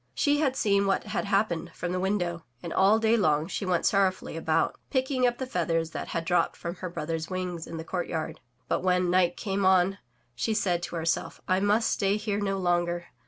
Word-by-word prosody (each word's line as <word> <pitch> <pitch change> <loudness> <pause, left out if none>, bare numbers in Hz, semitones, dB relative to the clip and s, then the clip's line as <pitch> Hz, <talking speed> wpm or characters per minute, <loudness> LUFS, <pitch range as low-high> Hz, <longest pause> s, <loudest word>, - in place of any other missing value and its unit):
She 290 -1 +2
had 270 -4 +1
seen 200 -5 +2
what 195 - +1
had - - -3
happened 195 -4 0
from 175 +1 -3
the 185 - -1
window, 180 -3 -1 0.2
and 170 - -4
all 195 +3 +5
day 225 +1 +3
long 155 -8 +2
she 195 +2 -4
went 180 -2 +1
sorrowfully 195 -2 +1
about, - - 0
picking 260 -2 +1
up 240 0 -1
the 260 - -3
feathers 165 -7 -1
that - - -5
had 165 -1 -3
dropped 175 0 +2
from 170 - -4
her 185 - -5
brothers' 165 -1 -4
wings 180 -3 -4
in 165 - -6
the 160 - -5
courtyard. 160 -2 -3 0.3
But - - 0
when 180 -1 +2
night 175 -1 +3
came 195 -1 -2
on, 190 +1 +4 0.3
she 170 - -1
said 180 -5 +1
to 175 - -5
herself, 165 0 -1
*T 185 0 +3
must 205 +3 +2
stay 200 0 +1
here 210 -1 -2
no 195 -1 -1
longer. 175 -1 0
185 Hz, 210 wpm, -27 LUFS, 170-205 Hz, 0.3 s, all